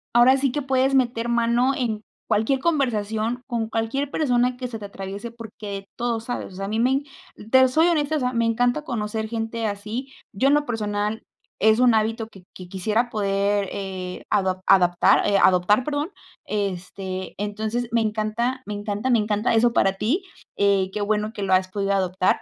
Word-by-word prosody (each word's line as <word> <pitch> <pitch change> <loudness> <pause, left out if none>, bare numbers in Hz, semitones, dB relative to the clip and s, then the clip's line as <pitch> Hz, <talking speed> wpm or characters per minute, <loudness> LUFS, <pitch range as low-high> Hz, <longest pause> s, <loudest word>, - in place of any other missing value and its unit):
ahora 250 +3 +6
sí 275 -1 +1
que 290 - -2
puedes 265 0 +2
meter 240 -2 +1
mano 235 +2 +2
en 225 -5 -2 0.3
cualquier 220 +5 +1
conversación, 240 -6 0
con 235 -3 -2
cualquier 225 +6 -1
persona 250 -4 +1
que 250 0 -4
se 230 -2 -7
te 205 - -7
atraviese, 200 +3 -7
porque 210 -3 -8
todo 235 -1 -1
sabes, 230 -4 -5
o - - -12
sea, 195 +1 -4
a - - -4
mí 220 +1 -1
me 250 +3 +3
en 275 +2 +1 0.5
te 260 0 +7
soy 315 +6 +3
honesta, 310 -3 +1
o - - +1
sea, 250 -1 -1
me 230 -1 +1
encanta 245 +5 +1
conocer 220 -4 -3
gente 225 0 -3
así, 215 +6 -5 0.2
yo 235 +7 +2
en 280 - +4
lo 295 0 +1
personal 210 -2 -2 0.4
es 220 +1 +4
un 250 -2 +5
hábito 225 +1 0
que 195 -4 -16
que 185 - -9
quisiera 215 +6 0
poder, 200 -1 0
eh, 185 -2 -5
adop 190 -2 +1
adaptar, 180 +1 +4
eh, 200 -1 +3
adoptar, 190 +5 +4
perdón, 295 +3 -2 0.4
este, 190 -2 -4
entonces 215 +4 -2
me 235 - +3
encanta, 220 +4 -1
me 210 - -5
encanta, 205 +4 -3
me 240 -3 +4
encanta 210 +2 0
eso 230 +1 +3
para 195 -4 +3
ti, 240 - -1 0.3
eh, 200 -2 +2
qué 210 - -3
bueno 210 +1 0
que 205 - -5
lo 190 -1 +1
has 185 0 +3
podido 195 +1 -2
adoptar. 185 -1 +1
220 Hz, 190 wpm, -23 LUFS, 200-245 Hz, 0.5 s, te